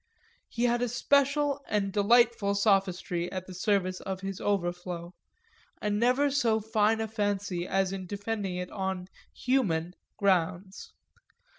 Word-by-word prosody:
He 235 - -3
had 240 0 +2
a 245 - 0
special 280 +3 +2
and 195 -2 -1
delightful 215 -1 +3
sophistry 190 -4 +1
at 185 -1 -5
the 185 - -10
service 185 -1 0
of 190 -1 -5
his 195 -1 -5
overflow, 175 -2 -2 0.7
and 210 0 -1
never 255 +5 +3
so 235 -6 +2
fine 220 0 +1
a 220 - -1
fancy 205 -4 -2
as 195 0 0
in 190 -1 -5
defending 205 -1 -3
it 180 0 -5
on 190 -2 -3 0.2
"human" 180 -11 0 0.2
grounds. 190 0 0
200 Hz, 135 wpm, -29 LUFS, 185-225 Hz, 0.7 s, delightful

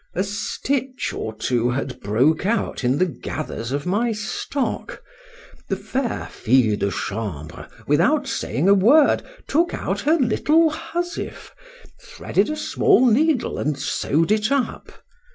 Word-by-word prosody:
A 185 - +1
stitch 255 +6 -3
or 110 - -4
two 120 +1 0
had 130 +1 -3
broke 130 +12 +2
out 220 - -1
in 125 +3 +2
the 185 - +3
gathers 120 -6 -5
of 145 +3 -2
my 215 +6 +1
stock; 220 +5 -3 0.7
the - - +1
fair 260 -2 -3
fille 115 -3 +2
de 100 - -1
chambre, 95 -6 -5 0.2
without 190 - +2
saying 150 - -1
a 200 - +7
word, 255 +10 +5 0.2
took 340 +4 +1
out - - -3
her 310 +3 +3
little 310 +4 +3
housewife, 345 +2 -5 0.5
threaded - - -1
a 305 - -2
small 260 -3 +3
needle, 265 +4 +2
and 150 -1 -1
sew'd 155 +4 0
it 215 +3 +1
up. 280 -3 -1
200 Hz, 135 wpm, -22 LUFS, -, 0.7 s, a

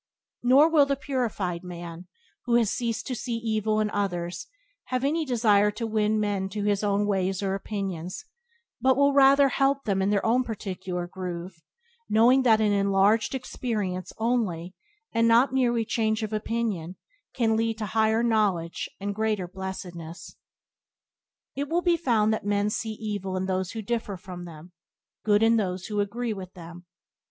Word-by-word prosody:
Nor 265 +5 +6
will 305 -4 +4
the 275 - +1
purified 235 -11 -2
man, 175 -1 -8 0.4
who 240 -2 +2
has 230 -4 +3
ceased 235 -2 -2
to 260 - -3
see 240 0 -3
evil 220 -1 0
in 210 -1 0
others, 175 -3 -3 0.4
have 255 0 -2
any 315 +3 +1
desire 215 -5 +3
to 230 +3 -4
win 215 -1 +1
men 200 -2 -1
to 205 +1 -4
his 205 0 +1
own 205 0 +1
ways 195 -1 0
or 195 -1 0
opinions, 195 - -4 0.6
but 260 0 +4
will 280 0 +4
rather 275 0 +6
help 275 +1 +1
them 195 -2 0
in 190 - +1
their 205 -1 +1
own 245 +3 +3
particular 190 -5 -4
groove, 175 -1 -7 0.5
knowing 240 +5 +5
that 225 -4 +4
an 215 -1 +2
enlarged 200 +4 +2
experience 210 -8 -3
only, 210 -7 -1 0.4
and 230 0 +3
not 240 +3 +4
merely 240 -3 +2
change 220 -1 0
of 215 0 -4
opinion 215 -6 -2 0.4
can 225 -3 +2
lead 225 0 0
to 220 - -3
higher 220 +2 +2
knowledge 205 -8 0
and 200 +1 -3
greater 215 -3 -1
blessedness. 180 -2 -7 1.2
It 280 +1 -3
will 345 +2 +1
be 350 -1 +4
found 230 -9 +2
that 220 - -3
men 205 +1 +1
see 220 0 -3
evil 205 -3 -4
in 185 - -1
those 185 -1 -2
who 220 -1 -5
differ 225 -3 -3
from 180 -1 -9
them, 165 +1 -11 0.5
good 210 0 +3
in 230 +1 +5
those 185 -3 -2
who 210 -1 -3
agree 225 +3 -1
with 190 -2 -8
them. 175 0 -11
215 Hz, 165 wpm, -26 LUFS, 190-235 Hz, 1.2 s, Nor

